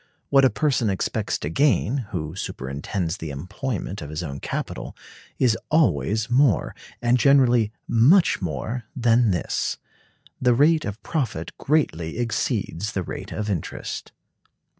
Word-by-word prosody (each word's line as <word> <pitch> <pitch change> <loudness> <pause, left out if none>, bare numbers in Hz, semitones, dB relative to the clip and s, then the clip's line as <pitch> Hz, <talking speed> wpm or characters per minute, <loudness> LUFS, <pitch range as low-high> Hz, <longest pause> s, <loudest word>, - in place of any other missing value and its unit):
What 135 0 +5
a 130 - +6
person 125 -2 +1
expects 95 - -1
to 75 - -4
gain, 130 - +2
who 80 -6 -4
superintends 80 +3 -3
the 80 - -6
employment 95 - -4
of 75 - -7
his 75 +3 -4
own 70 -4 -5
capital, - - -5 0.4
is 120 -4 +3
always 110 - +2
more, 125 -2 +3 0.3
and 120 +1 +3
generally 125 -5 +4 0.2
much 145 - +4
more, 95 - -3
than 120 -2 +3
this. 90 -3 -1 0.6
The 125 -1 +4
rate 155 +4 +4
of 100 +1 -6
profit 115 - -3
greatly 85 - 0
exceeds 110 -4 -1
the 95 - -1
rate - - -7
of 105 - -3
interest. 95 -7 -4
110 Hz, 135 wpm, -24 LUFS, 85-130 Hz, 0.6 s, a